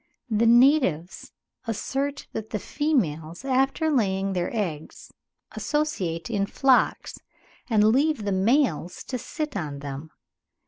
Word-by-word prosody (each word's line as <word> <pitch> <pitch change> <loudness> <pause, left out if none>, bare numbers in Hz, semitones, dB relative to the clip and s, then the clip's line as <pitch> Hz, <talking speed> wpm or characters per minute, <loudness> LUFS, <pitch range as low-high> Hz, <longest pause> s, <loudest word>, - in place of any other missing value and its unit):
The 220 +2 +3
natives 235 - +3 0.4
assert 275 +6 -2
that 220 0 -5
the - - -2
females 185 - -1
after 270 +4 +1
laying 195 -6 +1
their 180 -1 -1
eggs 175 -9 -5 0.4
associate 190 - -2
in 200 -4 -1
flocks, 265 +3 +2 0.5
and 215 -3 +4
leave 270 +3 +3
the 200 - 0
males 195 - +1
to 255 - -4
sit 305 +3 -5
on 150 -7 -4
them. 140 +2 -7
220 Hz, 120 wpm, -25 LUFS, 175-270 Hz, 0.5 s, and